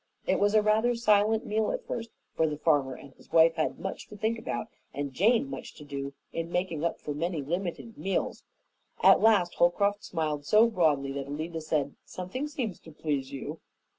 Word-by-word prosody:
It - - +2
was 205 +1 +3
a 215 - +5
rather 220 +3 +3
silent 215 -1 +3
meal 215 +1 0
at - - -4
first, 230 -1 -4 0.2
for 160 - +2
the 150 -1 -3
farmer 145 -5 +2
and 135 +1 -13
his - - -21
wife 165 0 +6
had 160 -1 -1
much 190 - -5
to 210 - -11
think 220 +2 0
about 120 - -3 0.3
and 140 -1 -3
Jane 230 - +3
much 275 - -7
to 150 - -11
do 140 -1 -5 0.2
in 165 0 -3
making 175 -4 -1
up 170 - -1
for 150 - -4
many 165 0 -2
limited 175 +8 -4
meals. 195 0 -2 0.6
At - - +7
last 205 -6 +4
Holcroft 200 +4 +2
smiled 155 -4 -2
so 215 +9 +6
broadly 150 -8 +2
that 140 0 -4
Alida 160 +3 -4
said, 150 -3 -1
"Something 190 +11 -5
seems 245 - -4
to 160 - -13
please 145 -3 -2
you." 145 +3 -6
170 Hz, 195 wpm, -29 LUFS, 150-215 Hz, 0.6 s, At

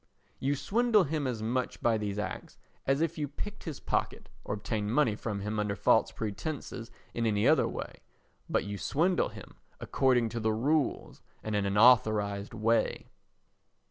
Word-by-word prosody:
You 140 +2 0
swindle 215 - +3
him 150 -2 -2
as 115 -4 -3
much 125 +3 -1
by 115 -2 +2
these 105 -1 -3
acts 105 - -5 0.3
as 135 +2 +2
if 165 0 -1
you 145 - -1
picked 205 +9 -7
his 160 -5 -5
pocket, - - -2
or - - -3
obtained 105 0 -3
money 130 -8 +3
from 105 -2 -4
him 105 +1 -2
under 105 -1 -1
false 105 +2 +3
pretences 115 +2 -5 0.2
in 115 -1 0
any 105 -1 +2
other - - +4
way; - - -6 0.5
but - - +1
you 100 -1 -5
swindle 175 - +1
him - - -12 0.2
according 125 -4 +2
to 115 - -4
the 110 -1 +1
rules 140 +6 0 0.2
and 110 -1 -2
in 100 -1 +1
an 100 +1 -1
authorised 105 -3 +4
way. 115 +1 0
115 Hz, 170 wpm, -30 LUFS, 105-145 Hz, 0.5 s, other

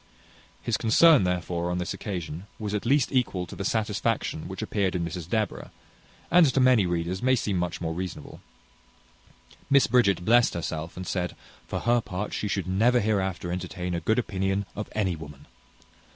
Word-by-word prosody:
His - - 0
concern, 130 - +5
therefore, 90 -1 -1
on 90 - -1
this 90 +1 -2
occasion, 90 -2 -5
was 105 -2 -4
at 105 +2 -2
least 140 0 +3
equal 115 -9 0
to - - -10
the 100 - -4
satisfaction 110 -5 -1
which 95 +3 -5
appeared 100 -3 -1
in 85 -1 -1
Mrs 85 0 -6
Deborah, 110 -1 -2 0.6
and 175 -2 +7
to 135 - +1
many 125 -7 +5
readers 85 +2 -2
may 130 +1 +3
seem 105 -5 -1
much 85 -1 -2
more 80 -1 -2
reasonable. 90 -3 -6 1.3
Miss 140 -1 +6
Bridget 100 -7 +2
blessed 120 0 +4
herself, 80 -1 -4
and 95 - -5
said, 90 0 -2 0.3
"For - - -3
her 120 0 +3
part, 100 0 -5
she 105 - -2
should 100 -2 -1
never 110 +7 +3
hereafter 95 -5 -1
entertain 90 0 -4
a 85 - -1
good 110 +7 +1
opinion 95 -3 -1
of 105 +2 -5
any 95 -5 0
woman." 75 -2 -11
95 Hz, 175 wpm, -26 LUFS, 90-110 Hz, 1.3 s, and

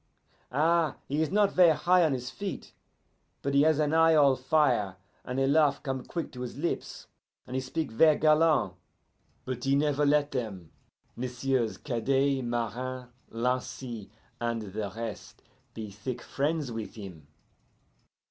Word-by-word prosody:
Ah, 160 +4 +2
he 145 +3 0
is 160 - +1
not 205 +1 +3
ver' 175 -3 +6
high 180 +4 +4
on 160 - +3
his 125 -1 -4
feet, 200 -1 -6 0.7
but 140 - -1
he 140 - +5
has 155 0 +4
an 150 0 +1
eye 165 0 +5
all 140 -3 +5
fire, 125 -8 +1 0.3
and 125 +1 -3
a 135 - +3
laugh 145 0 +3
come 130 -2 -3
quick 170 +4 -5
to 125 - -8
his 125 +1 -6
lips, 170 +4 -3 0.4
and 125 - -7
he - - +1
speak 140 +2 -3
ver' 155 +7 +5
galant, 155 - +3 0.7
but 125 -2 -4
he 135 +1 +2
never 145 0 +1
let 145 0 +3
them, 100 - -5 0.4
Messieurs 125 -1 -1
Cadet, 135 +2 0
Marin, 120 +2 -3 0.2
Lancy, 120 -2 -3 0.3
and 115 -1 -2
the 105 -2 -3
rest, 115 -2 -7 0.3
be 110 -2 -6
thick 115 +5 -6
friends 145 -2 -1
with 115 -2 -6
him. 90 -9 -10
135 Hz, 150 wpm, -29 LUFS, 120-150 Hz, 0.7 s, ver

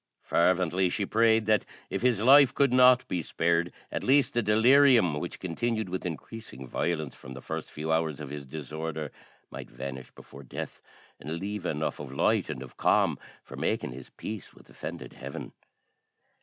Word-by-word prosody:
Fervently 90 +1 +2
she 100 +3 -1
prayed 110 +1 +3
that, 105 0 +3 0.3
if - - -2
his 120 -4 +2
life 135 +1 +7
could 140 -3 +3
not 125 0 +6
be 90 - -1
spared, 85 +2 0 0.2
at - - -3
least 140 +1 +3
the 120 - +2
delirium, 115 - +5
which 85 - -6
continued 110 +4 -2
with 90 0 -3
increasing 85 - -8
violence 80 +1 -2
from 65 0 -11
the - - -7
first - - -5
few 80 +1 -4
hours 80 -2 0
of 75 -2 -7
his 75 -2 -7
disorder, 80 +2 -5 0.4
might - - -8
vanish 65 -1 -7
before 70 - -13
death, 65 - -7 0.4
and 75 +4 -6
leave 100 0 -4
enough 75 +1 -2
of 70 -3 -7
light 70 - +1
and 65 - -5
of 65 - -14
calm - - +2 0.2
for - - -11
making - - -1
his 65 +1 -10
peace 110 -2 -8
with - - -18
offended - - -7
Heaven. 70 +1 -8
85 Hz, 170 wpm, -28 LUFS, 75-110 Hz, 0.4 s, life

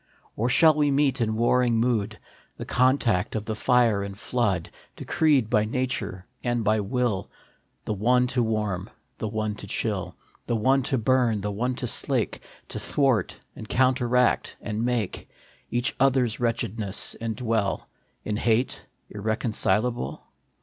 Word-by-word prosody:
Or 115 +3 0
shall 160 +4 +6
we 150 -1 +2
meet 135 -2 +2
in 110 -1 0
warring 120 +1 +3
mood, 110 -3 0 0.4
The - - -7
contact 125 -7 +2
of 110 -1 -2
the 110 - -2
fire 115 -2 +3
and 100 0 -6
flood, 105 -8 -1 0.2
Decreed 145 -8 +2
by 110 -2 +2
Nature 120 -6 -3 0.2
and 120 -2 0
by 110 +1 +2
Will, 105 -1 -1 0.6
The - - -1
one 125 +5 +3
to 125 - +2
warm, 105 -5 -1 0.3
the 110 - -2
one 110 0 -2
to - - -9
chill, - - -2 0.3
The 120 - 0
one 130 +5 +3
to 135 - +1
burn, 120 -2 +2
the 105 +1 -2
one 125 +5 -1
to 125 - -4
slake, - - -1 0.3
To - - -5
thwart 135 -9 +1 0.2
and 110 - -9
counteract 125 -1 +2
and 110 +1 -3
make 120 -5 -2 0.4
Each 120 0 0
other 135 -1 +4
s 115 -2 -4
wretchedness, 115 -4 -2
and 115 -1 -2
dwell 110 -4 -1 0.4
In 105 -1 -1
hate 120 +2 0 0.3
irreconcilable 110 - -1
115 Hz, 150 wpm, -25 LUFS, 105-125 Hz, 0.6 s, shall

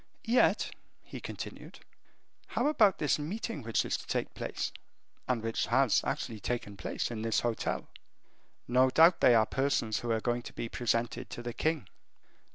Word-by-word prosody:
Yet," 235 +2 +3 0.3
he - - -8
continued, - - -8 0.7
"how - - -1
about 220 - +4
this 150 0 +1
meeting 170 +2 -4
which 115 -1 0
is - - 0
to - - -11
take - - -2
place, - - -3 0.6
and 120 -3 0
which 115 0 -1
has 130 -1 +4
actually 110 -2 -3
taken 115 -2 -3
place, 100 - -3
in 110 -2 -4
this 115 0 +1
hotel? 120 -2 -2 0.8
No 130 +2 +4
doubt 165 +6 +6
they 120 - +7
are 110 -1 +5
persons 125 -4 0
who 120 - -5
are 115 -1 +2
going 120 +1 -1
to - - -10
be 115 - -4
presented 115 0 -1
to 120 - -7
the 120 0 -4
king. 155 - -1
120 Hz, 165 wpm, -31 LUFS, 115-145 Hz, 0.8 s, they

